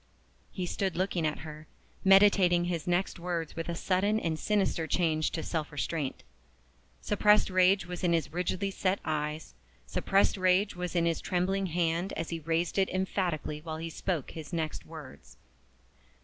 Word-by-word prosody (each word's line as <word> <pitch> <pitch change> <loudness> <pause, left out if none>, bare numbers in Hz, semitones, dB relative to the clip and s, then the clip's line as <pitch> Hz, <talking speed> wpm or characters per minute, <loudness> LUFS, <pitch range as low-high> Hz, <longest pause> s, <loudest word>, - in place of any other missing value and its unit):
He 185 - -3
stood 190 +1 -2
looking 180 -3 0
at 150 - -3
her, 155 +1 -9 0.4
meditating 195 -3 +5
his 175 -2 -3
next 175 +1 0
words 170 -2 -3
with 165 +1 -4
a 170 - -2
sudden 200 +5 +1
and 160 -5 -2
sinister 195 -6 0
change 155 -3 +1
to 160 - -4
self 160 -2 -3
restraint. 145 -1 -3 0.8
Suppressed 210 -1 +3
rage 185 +1 +4
was 180 +1 -6
in 175 - +3
his 165 -2 0
rigidly 180 +3 -1
set 190 0 0
eyes, 150 0 -3 0.3
suppressed 195 - +2
rage 185 +2 +2
was 180 0 -4
in 170 -1 +3
his 165 -1 0
trembling 190 +2 0
hand 170 +2 0
as 165 - -4
he 165 - -3
raised 165 +4 0
it 190 - +2
emphatically 180 -5 -2
while 160 0 -5
he 165 +1 -5
spoke 170 -4 -3
his 160 0 -8
next 160 -3 -3
words. 130 - -11
175 Hz, 165 wpm, -30 LUFS, 160-190 Hz, 0.8 s, meditating